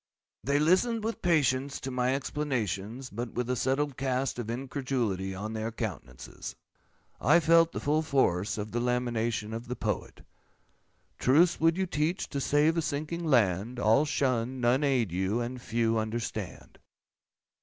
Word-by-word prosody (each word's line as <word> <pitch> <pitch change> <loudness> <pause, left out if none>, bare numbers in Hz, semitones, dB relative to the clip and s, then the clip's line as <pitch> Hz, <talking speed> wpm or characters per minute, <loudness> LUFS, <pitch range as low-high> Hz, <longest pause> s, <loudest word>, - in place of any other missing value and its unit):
They 140 +5 +2
listened 190 +9 +2
with 225 +1 -3
patience 140 -5 +1
to 135 - -4
my 125 +1 +1
explanations, 130 - -3
but 115 +3 -5
with 125 -1 -2
a - - +1
settled 135 +2 0
cast 130 -1 -1
of 115 -2 -4
incredulity 120 -7 -2
on 105 +3 -5
their 110 +1 -3
countenances. 85 - -6 0.7
I 150 +8 +5
felt 165 +1 +5
the - - -4
full 150 +2 +1
force 110 - +1
of 105 0 -4
the 120 - -1
lamentation 120 -3 -1
of 115 +2 -6
the 125 - -3
Poet:— - - -4 0.9
'Truths 160 +7 +4
would 165 +2 +3
you 190 - +1
teach, 165 +1 -1
to 140 - -3
save 150 +4 +3
a - - +3
sinking 155 +3 -3
land, 115 - +2
All 115 +5 +4
shun, 130 -4 0
none 125 +4 +2
aid 130 - +1
you, 95 +5 0
and 120 +1 -4
few 115 -1 0
understand. 110 +1 -5
125 Hz, 155 wpm, -29 LUFS, 115-145 Hz, 0.9 s, I